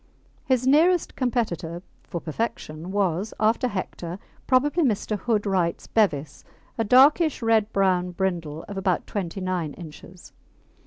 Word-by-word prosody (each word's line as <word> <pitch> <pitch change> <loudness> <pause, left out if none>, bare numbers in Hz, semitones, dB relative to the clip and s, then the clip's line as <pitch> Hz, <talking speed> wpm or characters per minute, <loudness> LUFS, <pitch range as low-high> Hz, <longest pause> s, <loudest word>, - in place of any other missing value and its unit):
His 255 -2 +1
nearest 325 +6 +3
competitor 185 - -2 0.2
for 175 - -5
perfection 165 -2 -4
was, 195 0 -1
after 225 +4 +2
Hector, 180 -4 -5 0.3
probably 290 +6 +3
Mr. 215 -4 0
Hood 215 0 -1
Wright's 185 -4 0
Bevis, 155 -10 0 0.3
a 225 - 0
darkish 275 +5 +4
red 225 -1 +2
brown 185 -2 +2
brindle 170 -4 -3
of 200 - -7
about 190 -2 0
29 185 -4 -3
inches. 170 +2 -12
195 Hz, 120 wpm, -24 LUFS, 175-235 Hz, 0.3 s, darkish